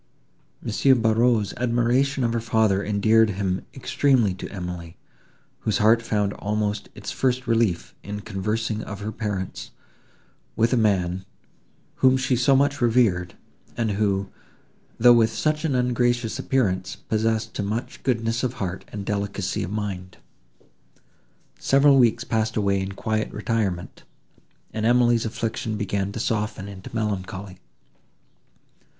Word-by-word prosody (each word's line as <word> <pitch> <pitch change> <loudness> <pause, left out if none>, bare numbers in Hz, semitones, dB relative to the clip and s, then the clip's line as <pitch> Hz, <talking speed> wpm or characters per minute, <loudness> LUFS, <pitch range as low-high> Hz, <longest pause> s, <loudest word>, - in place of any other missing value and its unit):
M. 130 +3 +3
Barreaux's 115 -2 +2
admiration 125 +3 +1
of 115 -1 +1
her 115 - 0
father 110 -3 +2
endeared 110 +2 +3
him 95 -2 -2
extremely 130 -6 +2
to 95 - -7
Emily, 90 -3 -6 0.6
whose 105 -3 0
heart 110 +2 +4
found 105 -3 0
almost 105 0 -2
its - - -6
first 130 -1 0
relief 115 -7 0
in 105 0 -6
conversing 110 +2 -2
of 100 -1 -7
her 105 +1 -3
parents, 105 -4 -4 0.9
with 115 +2 +2
a - - +4
man, 95 -5 +1 0.7
whom 130 0 +4
she 130 0 +1
so 130 +3 +3
much 140 +1 +2
revered, 110 -8 +2 0.4
and 115 -2 0
who, 100 -1 0 0.7
though 120 +1 +8
with 115 -1 +4
such 155 +8 -1
an 140 -5 0
ungracious 120 -2 +1
appearance, 95 -9 0
possessed 110 0 -1
to - - -3
much 105 +4 -4
goodness 115 -2 0
of 125 -2 -1
heart 95 -6 -4
and 100 -1 -7
delicacy 100 -2 -2
of - - -3
mind. 95 -3 -5 1.4
Several 140 0 +5
weeks 120 -1 +3
passed 110 -2 -1
away 100 -2 +2
in 95 +1 -4
quiet 110 +2 -2
retirement, 105 -5 -2 0.7
and 110 0 -3
Emily's 120 0 +3
affliction 110 0 -3
began 100 -1 -2
to 115 - -5
soften 105 -3 -2
into 100 -1 -9
melancholy. 100 -3 -4
110 Hz, 130 wpm, -24 LUFS, 100-120 Hz, 1.4 s, though